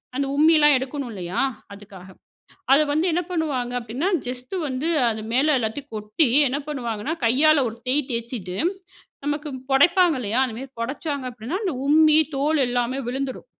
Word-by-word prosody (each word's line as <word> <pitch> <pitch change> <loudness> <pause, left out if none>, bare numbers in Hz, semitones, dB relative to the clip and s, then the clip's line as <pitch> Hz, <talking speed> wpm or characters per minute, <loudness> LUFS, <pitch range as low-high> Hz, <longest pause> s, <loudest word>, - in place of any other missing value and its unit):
அந்த 280 - 0
உம்மி 315 +3 +5
எல்லாம் 295 -1 +5
எடுக்கணும் 265 0 -5
இல்லையா, 180 -2 -4 0.3
அதுக்காக 200 -2 -13 0.7
அதை 280 +3 +6
வந்து 315 +5 +1
என்ன 350 - +1
பண்ணுவாங்க 285 -8 -2
அப்படின்னா, 245 - -3 0.2
ஜஸ்ட் 250 +4 -6
வந்து 260 +5 -2 0.2
அது 220 -1 -4
மேல 290 +5 +3
எல்லாத்தையும் 245 +5 -4
கொட்டி, 215 +6 +1 0.2
என்ன 265 +3 -2
பண்ணுவாங்கன்னா, 240 0 -3
கையால 280 +5 +4
ஒரு 225 - -8
தேய் 270 +1 +1
தேய்ச்சுட்டு, 230 -6 -4 0.7
நமக்கு 295 +1 -2 0.2
புடைப்பாங்க 340 +4 +4
இல்லையா, 230 +2 0
அது 245 -4 -4
மாதிரி 265 +1 -9
புடைச்சாங்க 280 +3 -3
அப்படின்னா, 245 - -5
அந்த 365 -7 -1
உம்மி 310 +1 +5 0.2
தோல் 295 +2 +1
எல்லாமே 245 +2 -1
விழுந்துடும். 265 +1 -4
265 Hz, 155 wpm, -23 LUFS, 235-300 Hz, 0.7 s, அதை